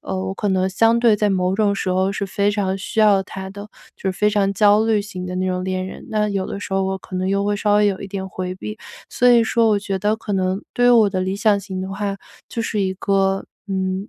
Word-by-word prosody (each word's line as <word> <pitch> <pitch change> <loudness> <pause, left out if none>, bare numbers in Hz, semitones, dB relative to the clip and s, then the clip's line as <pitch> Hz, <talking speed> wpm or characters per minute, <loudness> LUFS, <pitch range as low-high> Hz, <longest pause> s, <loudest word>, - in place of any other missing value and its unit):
呃， 95 - -4
我 95 - -2
可 205 - -2
能 190 -1 +1
相 225 +4 +3
对 235 -2 +4
在 210 0 +1
某 185 -1 +1
种 205 -1 +2
时 185 - -2
候 185 +1 +1
是 200 0 -3
非 200 +1 0
常 195 -2 -1
需 205 - -6
要 205 -3 +5
他 190 0 -8
的， 205 +2 -9 0.3
就 190 - -2
非 210 +3 +1
常 200 -2 +1
焦 210 +2 +4
虑 215 -2 +2
型 185 -3 -7
的 180 - -5
那 185 0 -1
种 180 0 -1
恋 185 0 -2
人， - - -10
那 215 -1 +1
有 195 -1 -2
的 - - -5
时 200 - -7
候 195 0 +1
我 190 0 -1
可 185 - -11
能 185 +1 -1
又 200 0 +1
会 205 0 +1
稍 205 0 +1
微 210 0 +4
有 195 -2 -1
一 200 - -7
点 190 -1 -5
回 185 -1 -5
避。 210 +3 -7 0.3
所 250 - +3
以 235 -1 +6
说 225 0 +2
我 210 -1 +3
觉 195 -1 -3
得 210 +3 +1
可 220 -2 -6
能 190 0 0
对 245 0 +2
于 - - +7
我 210 -2 +3
的 185 -1 -1
理 190 +1 -2
想 205 -1 +2
型 190 -1 -5
的 190 - -5
话 200 0 -3 0.3
就 230 - -3
是 215 -2 -2
一 190 -1 0
个， 195 0 0 0.2
嗯， 190 +1 -2
195 Hz, 290 characters per minute, -20 LUFS, 190-210 Hz, 0.3 s, 于